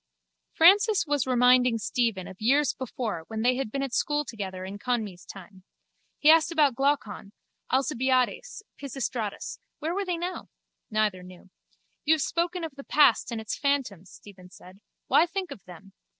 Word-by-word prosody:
Francis 400 +4 +5
was 290 -3 0
reminding 250 -1 +4
Stephen 225 -4 -1
of 190 - -12
years 275 +5 +3
before 235 -8 -5
when 220 0 -4
they 250 +1 +3
had 270 -5 -3
been 275 +2 -2
at 270 -3 -5
school 295 +3 0
together 190 -6 -6
in 200 +2 -8
Conmee's 215 -7 -3
time. 190 0 -12 0.6
He 300 - +6
asked 325 0 +4
about 300 -5 +3
Glaucon, 235 -7 -1 0.4
Alcibiades, 260 - 0 0.2
Pisistratus. 255 -6 -4 0.2
Where 320 +3 -3
were 400 +2 -1
they 355 -2 -2
now? 355 +2 -5 0.4
Neither 215 -4 0
knew. 180 0 -15 0.5
You 315 +1 +4
have 310 - -2
spoken 345 +1 -2
of 320 -3 -5
the 275 0 -11
past 280 -6 +3
and 230 - -3
its 220 -2 -4
phantoms, 255 - -2
Stephen 190 -3 -15
said. 185 +1 -16 0.3
Why 335 - +4
think 370 +1 -4
of 190 - -10
them? 185 +2 -14
250 Hz, 165 wpm, -27 LUFS, 205-295 Hz, 0.6 s, He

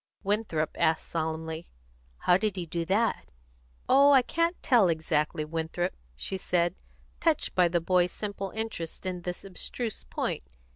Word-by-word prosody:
Winthrop 195 -7 0
asked 160 - +2
solemnly, 160 0 -3 0.5
"How 180 - +4
did 200 +1 0
he 180 -2 -3
do 165 +1 -3
that?" 215 +6 +1 0.6
"Oh, 280 +2 +7
I 265 -2 +7
can't 335 +6 +1
tell 230 -8 +5
exactly, 155 -1 0
Winthrop," 165 +3 -2 0.2
she 190 - -3
said, 175 -1 +1 0.5
touched 325 -2 +1
by 180 -1 +5
the 170 0 +1
boy's 180 +1 +3
simple 200 -2 -4
interest 220 -7 -4
in 180 -1 -3
this 180 0 -5
abstruse 215 +4 -3
point. - - -2
180 Hz, 145 wpm, -29 LUFS, 165-210 Hz, 0.6 s, Oh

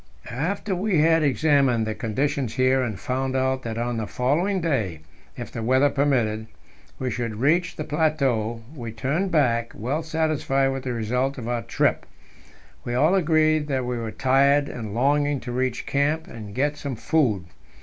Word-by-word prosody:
After 180 - -2
we 190 0 0
had 160 +2 +4
examined 140 -5 +3
the 110 - -2
conditions 125 +2 -2
here, 130 0 +3
and 110 -7 -3
found 130 +1 -2
out 130 0 +1
that 115 -2 -5
on 120 0 -2
the 110 -2 -3
following 170 +10 0
day 115 - -1 0.4
if - - -7
the 115 - -5
weather 130 +5 +3
permitted 120 -6 +1 0.5
we 130 -1 -2
should 115 -3 -3
reach 165 - +1
the 155 - -4
plateau, 135 -8 0
we 120 -5 -6
turned 140 - -1
back, 120 -8 +1
well 130 +9 -2
satisfied 155 -4 0
with 135 -1 -4
the 125 - -1
result 125 +5 -1
of 120 -3 -6
our 120 -1 -1
trip. - - 0 0.8
We 120 - -3
all 155 +8 +4
agreed 155 -4 +3
that 130 -3 -1
we 125 0 -2
were 115 -1 -4
tired, 140 +4 +3
and 110 -3 -6
longing 145 +3 +2
to 125 - -6
reach 130 0 -1
camp 150 +3 0
and 105 -3 -9
get 145 +3 0
some 140 -3 -4
food. 115 - +1
135 Hz, 170 wpm, -24 LUFS, 120-150 Hz, 0.8 s, had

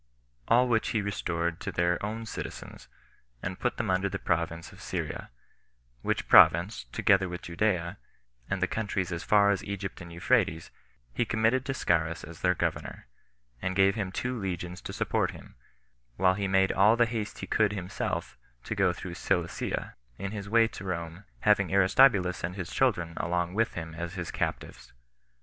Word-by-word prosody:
All 125 +2 +5
which 115 -2 +1
he 110 - 0
restored 85 -4 -2
to - - -4
their 85 +1 0
own 110 +2 -3
citizens, - - -7 0.6
and 90 0 -4
put 125 - -1
them 110 -5 -1
under 95 +1 +1
the 95 - -3
province 85 -2 -2
of - - -14
Syria; - - -4 0.7
which - - -1
province, 85 - +6
together 95 +10 +2
with 90 0 -6
Judea, 85 0 -1 0.5
and 95 -1 -1
the - - +3
countries 100 -5 -2
as 85 -1 -3
far 100 -1 +5
as 100 - -1
Egypt 100 -2 -5
and 85 -1 -9
Euphrates, 85 -2 +1 0.4
he - - +1
committed 115 +3 +1
to 135 - -1
Scaurus 85 -5 0
as 85 +1 -10
their 90 0 +3
governor, - - -3 0.6
and 95 0 -2
gave 95 0 +5
him 100 -4 -3
two 125 +5 -2
legions 90 -2 -4
to - - -6
support - - 0
him; - - -15 0.6
while 95 0 +4
he 100 +1 -2
made 95 0 +3
all 105 +4 +5
the 120 0 +4
haste 110 -2 -4
he - - -5
could 110 -2 +2
himself 90 -9 -4 0.2
to - - -3
go 95 -3 +3
through 90 0 -7
Cilicia, - - -2 0.2
in 100 +1 -4
his 100 -2 -6
way 115 +1 +5
to 100 - -9
Rome, 85 0 -5 0.2
having - - +3
Aristobulus 100 -1 +4
and 90 +2 -3
his 90 -4 -5
children 85 -11 +1
along 85 +1 -1
with 115 +3 0
him 80 -1 -5
as 85 +2 -5
his 90 -3 -4
captives. - - -4
95 Hz, 175 wpm, -29 LUFS, 85-105 Hz, 0.7 s, province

